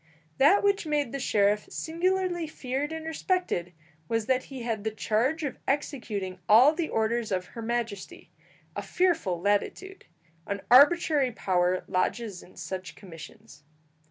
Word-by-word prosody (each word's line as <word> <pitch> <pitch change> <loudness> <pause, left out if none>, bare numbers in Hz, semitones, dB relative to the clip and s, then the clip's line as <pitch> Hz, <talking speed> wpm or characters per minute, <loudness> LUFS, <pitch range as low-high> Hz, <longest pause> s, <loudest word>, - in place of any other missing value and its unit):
That 360 +10 +5
which 400 -4 +1
made 295 -5 0
the 275 - -4
sheriff 210 -3 +1
singularly 350 0 -1
feared 280 0 -4
and 320 0 -6
respected 320 - -1 0.4
was 225 +2 -1
that 255 +1 +1
he 265 -3 -8
had 225 -3 -3
the 220 - 0
charge 235 +9 0
of 280 - -4
executing 220 -10 -2
all 245 +8 +7
the 325 0 -2
orders 225 0 -1
of 185 -1 -1
her 230 - -6
Majesty 230 -4 -4 0.4
a - - -3
fearful 330 - 0
latitude. 205 - -2 0.4
An 200 0 -3
arbitrary 290 0 +5
power 180 -4 0
lodges 195 +1 -2
in 180 - -18
such 185 -2 -6
commissions. 165 -5 -13
240 Hz, 140 wpm, -27 LUFS, 200-315 Hz, 0.4 s, all